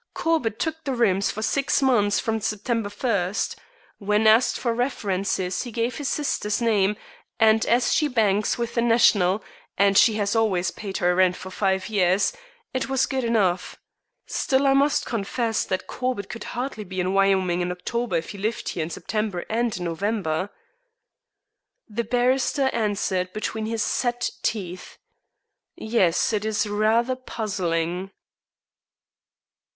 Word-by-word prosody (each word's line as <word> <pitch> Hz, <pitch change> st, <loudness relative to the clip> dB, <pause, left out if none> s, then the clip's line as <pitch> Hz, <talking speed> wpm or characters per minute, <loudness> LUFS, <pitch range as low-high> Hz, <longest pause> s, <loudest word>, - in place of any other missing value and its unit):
Corbett 315 Hz, -10 st, 0 dB
took 320 Hz, -2 st, -3 dB
the 270 Hz, -4 st, -2 dB
rooms 200 Hz, -5 st, +2 dB
for 215 Hz, -, -4 dB
six 275 Hz, +4 st, +1 dB
months 225 Hz, -7 st, +3 dB
from 225 Hz, -1 st, -1 dB
September 215 Hz, +1 st, -1 dB
first. 205 Hz, -3 st, -1 dB, 0.4 s
When 210 Hz, +2 st, +1 dB
asked 220 Hz, +3 st, +5 dB
for 235 Hz, -2 st, -1 dB
references 195 Hz, -6 st, -1 dB
he 245 Hz, -, -6 dB
gave 235 Hz, +2 st, -2 dB
his 290 Hz, -3 st, -2 dB
sister's 240 Hz, -8 st, -1 dB
name, 210 Hz, -4 st, +2 dB, 0.4 s
and 220 Hz, 0 st, +5 dB
as 240 Hz, +1 st, +3 dB
she 305 Hz, -, +2 dB
banks 210 Hz, -5 st, +1 dB
with 235 Hz, -1 st, -3 dB
the 235 Hz, -, +1 dB
National 215 Hz, -4 st, +3 dB, 0.3 s
and 200 Hz, 0 st, +4 dB
she 220 Hz, +2 st, +6 dB
has 205 Hz, 0 st, 0 dB
always 185 Hz, -5 st, +1 dB
paid 195 Hz, -2 st, -6 dB
her 180 Hz, 0 st, +2 dB
rent 180 Hz, 0 st, +3 dB
for 190 Hz, -, -9 dB
five 190 Hz, 0 st, 0 dB
years 195 Hz, -, +2 dB, 0.4 s
it 260 Hz, 0 st, -2 dB
was 270 Hz, -1 st, +2 dB
good 265 Hz, -2 st, -2 dB
enough. 195 Hz, -6 st, 0 dB, 0.5 s
Still, 270 Hz, 0 st, 0 dB
I 270 Hz, -, +5 dB
must 280 Hz, +2 st, +2 dB
confess 225 Hz, +1 st, -1 dB
that 185 Hz, -, -2 dB
Corbett 250 Hz, -6 st, -3 dB
could 230 Hz, -, -7 dB
hardly 245 Hz, -4 st, -3 dB
be 185 Hz, -1 st, -6 dB
in 185 Hz, +1 st, 0 dB
Wyoming 190 Hz, -2 st, +2 dB
in 175 Hz, 0 st, -1 dB
October 230 Hz, +3 st, -3 dB
if 165 Hz, 0 st, -2 dB
he 200 Hz, -, -9 dB
lived 220 Hz, +4 st, -2 dB
here 170 Hz, -, -3 dB
in 160 Hz, -, -3 dB
September 210 Hz, -1 st, -3 dB
and 230 Hz, -1 st, 0 dB
in 180 Hz, -, -5 dB
November." 185 Hz, 0 st, -1 dB, 1.4 s
The 230 Hz, +1 st, -3 dB
barrister 255 Hz, +3 st, +1 dB
answered 195 Hz, -4 st, -1 dB
between 215 Hz, 0 st, -3 dB
his 225 Hz, -1 st, -1 dB
set 245 Hz, -1 st, -1 dB
teeth: 185 Hz, -4 st, -4 dB, 0.8 s
"Yes, 220 Hz, -3 st, +1 dB
it 210 Hz, -1 st, 0 dB
is 215 Hz, 0 st, 0 dB
rather 220 Hz, +4 st, +1 dB
puzzling." 185 Hz, -7 st, -2 dB
215 Hz, 150 wpm, -24 LUFS, 190-235 Hz, 1.4 s, she